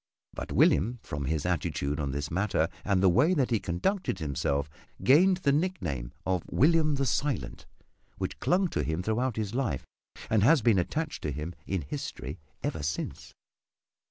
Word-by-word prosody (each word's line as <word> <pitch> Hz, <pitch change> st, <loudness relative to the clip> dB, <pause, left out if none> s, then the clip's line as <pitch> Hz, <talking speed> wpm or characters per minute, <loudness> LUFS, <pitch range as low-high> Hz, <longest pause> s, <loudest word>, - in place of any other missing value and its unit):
But -, -, -6 dB
William, 120 Hz, +7 st, +3 dB
from 70 Hz, -1 st, -4 dB
his 80 Hz, +2 st, -1 dB
attitude 75 Hz, -4 st, -1 dB
on 70 Hz, -2 st, -1 dB
this 70 Hz, +2 st, -3 dB
matter 90 Hz, -2 st, +1 dB
and 100 Hz, -2 st, +1 dB
the -, -, +7 dB
way 140 Hz, -, +4 dB
that 130 Hz, -5 st, +1 dB
he 115 Hz, -, +3 dB
conducted 100 Hz, -, -1 dB
himself, 70 Hz, -2 st, -1 dB, 0.4 s
gained 180 Hz, +8 st, +6 dB
the 140 Hz, -6 st, +2 dB
nickname 90 Hz, -, -1 dB
of 90 Hz, -2 st, +1 dB
"William 155 Hz, 0 st, +3 dB
the 135 Hz, 0 st, 0 dB
Silent" 140 Hz, +2 st, -2 dB, 0.5 s
which -, -, -4 dB
clung 185 Hz, +2 st, +2 dB
to -, -, -1 dB
him 80 Hz, +3 st, -2 dB
throughout 115 Hz, +4 st, 0 dB
his 110 Hz, -2 st, -3 dB
life 120 Hz, -, -1 dB, 0.4 s
and 110 Hz, -2 st, +2 dB
has 140 Hz, +3 st, +5 dB
been 110 Hz, -5 st, +4 dB
attached 155 Hz, -, -2 dB
to 75 Hz, -, -2 dB
him 75 Hz, +5 st, -5 dB
in 95 Hz, -5 st, -1 dB
history 70 Hz, +2 st, -6 dB, 0.2 s
ever 80 Hz, -, -2 dB
since. 75 Hz, +2 st, -4 dB
100 Hz, 165 wpm, -29 LUFS, -, 0.5 s, the